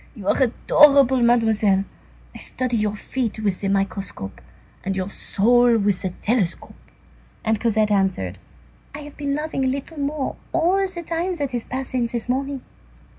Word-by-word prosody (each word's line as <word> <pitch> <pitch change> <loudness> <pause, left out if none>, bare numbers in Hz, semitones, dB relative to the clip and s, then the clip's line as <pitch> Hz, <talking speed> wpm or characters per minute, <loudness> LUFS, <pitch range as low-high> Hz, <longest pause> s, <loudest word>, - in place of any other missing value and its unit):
You 205 -5 -8
are - - +2
adorable, 265 +1 +5
Mademoiselle. 220 -5 +3 0.5
I - - -10
study 255 -2 -1
your 210 -1 0
feet 235 +1 -3
with 205 -4 -1
the 200 - -1
microscope 195 - -3 0.4
and 190 0 -2
your 190 +1 -3
soul 240 +4 +3
with 200 -3 +1
the 190 - -1
telescope." 210 -6 -1 0.7
And 220 -1 +1
Cosette 220 -2 +1
answered:— 185 - 0 0.6
"I 300 - -7
have 295 -1 -11
been 280 -1 -2
loving 300 -2 -2
a - - +2
little 280 +4 -4
more 285 0 -2 0.2
all 370 +4 +2
the 345 -2 -6
time 340 +3 -2
that 285 -5 -3
has 240 -2 -3
passed 260 0 -3
since 240 -2 -1
this 235 -1 -3
morning." 270 +1 -2
240 Hz, 165 wpm, -22 LUFS, 205-280 Hz, 0.7 s, adorable